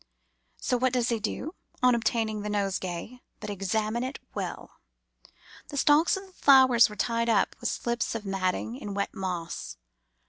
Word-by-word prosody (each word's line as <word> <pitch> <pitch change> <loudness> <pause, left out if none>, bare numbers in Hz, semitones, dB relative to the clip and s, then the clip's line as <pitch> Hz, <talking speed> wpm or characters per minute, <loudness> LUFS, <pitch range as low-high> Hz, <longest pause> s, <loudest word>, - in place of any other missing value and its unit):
So 250 - 0
what 255 +1 +1
does 250 -1 +1
he 230 -2 0
do, 265 - -4 0.3
on 250 0 +6
obtaining 225 -2 0
the 210 - -4
nosegay, 200 +3 -3 0.2
but 210 -1 -5
examine 215 +4 -1
it 260 +2 -4 0.2
well. - - -6 0.9
The 285 - -6
stalks 300 +7 +4
of 385 - -8
the 380 - -19
flowers 260 -7 +6
were 210 - -9
tied 230 +2 0
up 220 - +2
with - - -1
slips 235 -1 -2
of 220 -2 -4
matting 195 +4 -1
in 205 -6 -6
wet 200 - -2
moss. 175 - -4
225 Hz, 165 wpm, -28 LUFS, 200-250 Hz, 0.9 s, on